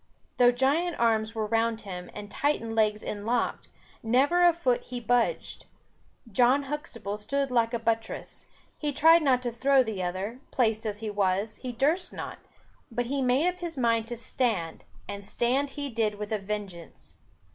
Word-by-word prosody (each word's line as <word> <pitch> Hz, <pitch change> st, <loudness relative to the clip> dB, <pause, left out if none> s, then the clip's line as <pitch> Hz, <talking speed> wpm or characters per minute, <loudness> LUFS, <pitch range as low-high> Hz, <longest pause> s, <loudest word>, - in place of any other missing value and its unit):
Though 245 Hz, 0 st, +6 dB
giant 285 Hz, +8 st, +1 dB
arms 225 Hz, -1 st, +2 dB
were 220 Hz, -1 st, -1 dB
round 225 Hz, +1 st, 0 dB
him 180 Hz, -3 st, -7 dB
and 205 Hz, 0 st, -8 dB
Titan 230 Hz, -3 st, -1 dB
legs 215 Hz, -1 st, +1 dB
inlocked, 225 Hz, +4 st, -2 dB, 0.3 s
never 270 Hz, +10 st, +3 dB
a 350 Hz, 0 st, +7 dB
foot 265 Hz, -8 st, 0 dB
he 245 Hz, 0 st, -5 dB
budged. 245 Hz, -, 0 dB, 0.6 s
John 250 Hz, +6 st, +4 dB
Huxtable 265 Hz, -8 st, -5 dB
stood 275 Hz, +5 st, -1 dB
like 230 Hz, -2 st, +2 dB
a 235 Hz, -, 0 dB
buttress. 225 Hz, -1 st, -3 dB, 0.3 s
He 295 Hz, -2 st, -1 dB
tried 325 Hz, +4 st, +6 dB
not 255 Hz, -4 st, +2 dB
to 240 Hz, -, -1 dB
throw 265 Hz, +3 st, +4 dB
the 220 Hz, -5 st, -4 dB
other; 190 Hz, +7 st, -3 dB
placed 225 Hz, -3 st, +1 dB
as 210 Hz, 0 st, -4 dB
he 220 Hz, -1 st, -3 dB
was, 200 Hz, +2 st, 0 dB
he 255 Hz, -, -5 dB
durst 295 Hz, +10 st, 0 dB
not; -, -, -6 dB, 0.5 s
but 245 Hz, 0 st, -2 dB
he 275 Hz, +3 st, -1 dB
made 260 Hz, +6 st, +3 dB
up 360 Hz, 0 st, -1 dB
his 340 Hz, -4 st, -5 dB
mind 230 Hz, -2 st, +2 dB
to 240 Hz, 0 st, -5 dB
stand, 225 Hz, -8 st, -1 dB, 0.2 s
and 200 Hz, 0 st, -6 dB
stand 255 Hz, +7 st, 0 dB
he 285 Hz, -1 st, -2 dB
did 225 Hz, -4 st, -1 dB
with 210 Hz, +1 st, -6 dB
a 215 Hz, -, 0 dB
vengeance. 195 Hz, -4 st, -7 dB
235 Hz, 170 wpm, -28 LUFS, 215-270 Hz, 0.6 s, a